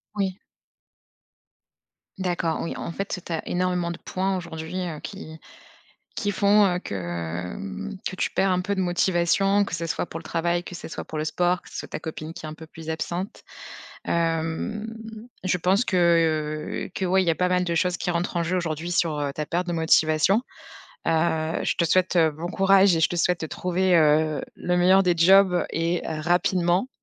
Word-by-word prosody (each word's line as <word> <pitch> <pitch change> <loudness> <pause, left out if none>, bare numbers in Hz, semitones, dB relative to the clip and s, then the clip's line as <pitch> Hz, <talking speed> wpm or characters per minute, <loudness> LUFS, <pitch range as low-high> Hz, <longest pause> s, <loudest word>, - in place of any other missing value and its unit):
Oui. 195 -2 -1 1.8
D'accord 175 -3 -1
oui, 165 - -3
en - - -5
fait, 195 +3 -3
tu - - -3
sais, 180 - -9
tu 170 - -10
as 160 - -4
énormément 180 -1 0
de 170 - -6
points 190 +1 -2
aujourd'hui 170 +1 -5
heu, 155 -3 -6
qui 160 -6 -8 0.8
qui 205 -3 -1
font, 205 +1 +4
heu, 180 -2 +1
que 85 - -4
mmh, 95 - -6
que 185 - -7
tu - - -1
perds 195 - +2
un 180 0 +1
peu 200 +2 -2
de 190 - -2
motivation, 185 +2 +2
que - - -4
ce 170 0 -4
soit 165 - -2
pour 165 - -6
le 165 - -13
travail, 170 +1 -1
que 180 - -9
ce 170 - -7
soit - - -6
pour 155 - -6
le 155 - -1
sport, 175 +2 +1
que - - -16
ce - - -8
soit - - -5
ta - - -5
copine 160 0 -6
qui 160 - -9
est 155 - -5
un - - -7
peu 160 - -11
plus 160 0 -10
absente. 175 +4 -4 0.6
Hem, 165 +6 -1 0.6
je 180 -1 +1
pense 190 +6 +2
que, 190 - -1 0.9
heu, - - -14
que 190 - -2
ouais, 190 +1 +3
il - - -3
y 165 - +4
a - - +2
pas 180 +2 +1
mal 180 0 +2
de 170 -1 -1
choses 180 +1 +1
qui 180 - -1
rentrent 175 +1 -2
en 170 - +1
jeu 180 +3 0
aujourd'hui 165 -1 -3
sur, 165 -3 +1
heu, 140 -1 -1
ta 150 - -3
perte 175 +4 -2
de 175 - -2
motivation. 160 +3 +3 0.7
Heu, 160 -1 +1
je - - +1
te 170 - +2
souhaite 185 +2 +2
bon 160 +1 +2
courage 195 -1 +4
et - - 0
je 160 - +4
te 175 - -2
souhaite 175 +1 +1
de - - -1
trouver, 180 +3 0
heu, 155 -1 +3
le 180 0 -1
meilleur 185 +2 +5
des 180 -2 +2
jobs 185 +1 +5
et 165 +2 0
rapidement. 175 +5 +1
175 Hz, 210 wpm, -25 LUFS, 160-185 Hz, 1.8 s, meilleur